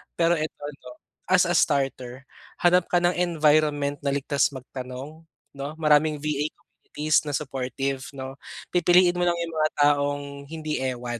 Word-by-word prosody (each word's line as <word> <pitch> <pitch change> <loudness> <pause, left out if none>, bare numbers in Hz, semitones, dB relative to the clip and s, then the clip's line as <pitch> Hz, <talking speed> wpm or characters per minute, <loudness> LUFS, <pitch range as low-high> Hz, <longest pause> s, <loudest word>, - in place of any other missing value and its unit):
Pero 170 0 +3
ito 155 +1 -3 0.2
'no, - - -12 0.4
as - - +5
a - - 0
starter, 135 -3 0 0.4
hanap 175 0 +4
ka 175 -1 +1
ng 175 +1 +2
environment 150 -4 +2
na 140 -1 -1
ligtas 140 0 +1
magtanong 130 +5 -8 0.2
'no. 140 0 -6
Maraming 150 -1 +2
VA 150 0 0
communities 155 +1 -1
na 145 - -1
supportive 135 -1 -3 0.2
'no. 135 0 -7 0.3
Pipiliin 180 0 +4
mo 175 - +2
lang 175 - +2
yung 165 -1 -6
mga 155 0 +3
taong 145 0 +2 0.2
hindi 155 -1 -4
ewan. 125 -2 -3
145 Hz, 150 wpm, -25 LUFS, 135-160 Hz, 0.4 s, as